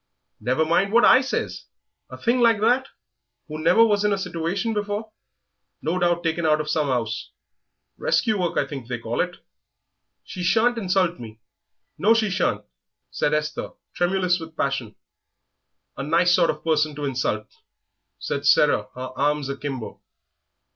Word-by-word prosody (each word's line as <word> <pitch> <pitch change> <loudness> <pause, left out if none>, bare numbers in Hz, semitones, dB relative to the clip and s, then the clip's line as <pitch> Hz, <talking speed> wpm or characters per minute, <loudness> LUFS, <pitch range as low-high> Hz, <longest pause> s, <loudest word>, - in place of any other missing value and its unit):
"Never 130 +6 +1
mind 185 +5 +2
what 235 +2 +5
I 255 - +7
says! 270 +1 -3 0.4
...A - - -9
thing 240 +2 +1
like 230 -3 +4
that, 250 +5 +2 0.6
who 155 0 -6
never 225 +7 +6
was 205 -2 +1
in 210 - +2
a 200 - +1
situation 195 +5 -2
before; 210 +1 -3 0.7
no 175 +3 -1
doubt 175 -1 +1
taken 165 0 -1
out 155 -1 +3
of 155 0 -2
some 150 -3 0
'ouse. 115 -3 -2 0.7
Rescue 215 -3 +1
work, 175 -2 -1
I - - +2
think 135 -4 -8
they 125 -1 -3
call 115 0 -2
it 180 0 -3 0.4
" - - -55
"She 185 - -8
shan't 230 +6 +2
insult 185 -3 0
me 110 -2 -10 0.6
no, 220 +4 +4
she 215 -3 +1
shan't!" 190 0 0 0.5
said 150 - 0
Esther, 150 0 -3 0.2
tremulous 180 0 +1
with 160 -1 -10
passion. 130 -6 -2 1.0
"A - - -5
nice 170 +5 +3
sort 175 -2 +3
of - - -3
person 155 -2 +1
to 145 0 -4
insult!" 125 -5 -1 0.7
said 140 0 -3
Sarah, 140 -8 +4
her 130 0 -6
arms 145 0 0
akimbo. 140 -4 -6
165 Hz, 160 wpm, -23 LUFS, 140-200 Hz, 1.0 s, I